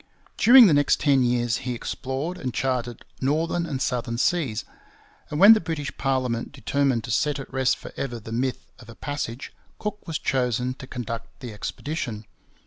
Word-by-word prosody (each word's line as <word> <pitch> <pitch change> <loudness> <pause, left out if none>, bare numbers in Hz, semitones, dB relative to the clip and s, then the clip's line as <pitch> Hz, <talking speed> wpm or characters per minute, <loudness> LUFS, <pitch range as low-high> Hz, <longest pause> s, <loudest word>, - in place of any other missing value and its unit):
During 245 +2 +8
the 175 - +5
next 145 0 +3
ten 140 -3 +3
years 120 -2 +1
he 125 -1 -4
explored 135 +9 -4
and 130 -5 -3
charted 125 -3 -2 0.2
northern 165 +5 0
and 140 -4 -3
southern 120 -3 -2
seas; 130 -6 0 0.6
and 150 - -3
when 200 +4 +10
the 220 - +2
British 160 -4 -4
parliament 130 -3 -1
determined 135 -2 0
to 120 - -5
set 150 +5 +1
at 135 -1 -9
rest 130 -1 +2
for - - -11
ever 120 -4 -4
the 110 +1 -10
myth 125 +3 -2
of 120 -2 -14
a 115 - -11
passage, 145 -3 -5 0.2
Cook 210 -2 -5
was 160 -2 -2
chosen 125 -1 0
to 130 - -9
conduct 115 -2 -6
the 120 -4 -7
expedition. 115 0 -5
130 Hz, 175 wpm, -25 LUFS, 120-150 Hz, 0.6 s, when